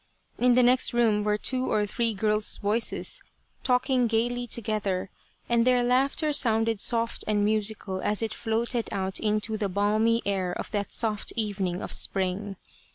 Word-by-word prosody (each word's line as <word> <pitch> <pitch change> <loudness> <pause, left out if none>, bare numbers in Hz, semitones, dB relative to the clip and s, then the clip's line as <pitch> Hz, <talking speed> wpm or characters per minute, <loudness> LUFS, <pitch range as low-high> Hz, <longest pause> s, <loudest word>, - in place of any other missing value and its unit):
In 245 0 +4
the 250 - +5
next 250 +1 +4
room 220 -3 +2
were 210 0 +1
two 255 +4 -1
or 210 -1 +2
three 230 +1 -1
girls' 210 +1 0
voices 215 +3 0 0.4
talking 250 -1 +2
gaily 240 +2 -1
together, 205 -5 -2 0.4
and 235 -1 +2
their 250 0 +3
laughter 275 +5 +1
sounded 225 -5 +2
soft 230 -1 0
and 205 -1 +1
musical 210 -3 -1
as 210 +2 0
it 220 -1 -2
floated 230 +1 -2
out 190 -1 -2
into 215 +1 -1
the 205 -2 -2
balmy 215 +4 +1
air 190 -3 -1
of - - -6
that 205 -2 -3
soft 215 -3 -1
evening 195 -5 -2
of - - -5
spring. 195 +1 -2
220 Hz, 160 wpm, -26 LUFS, 205-240 Hz, 0.4 s, the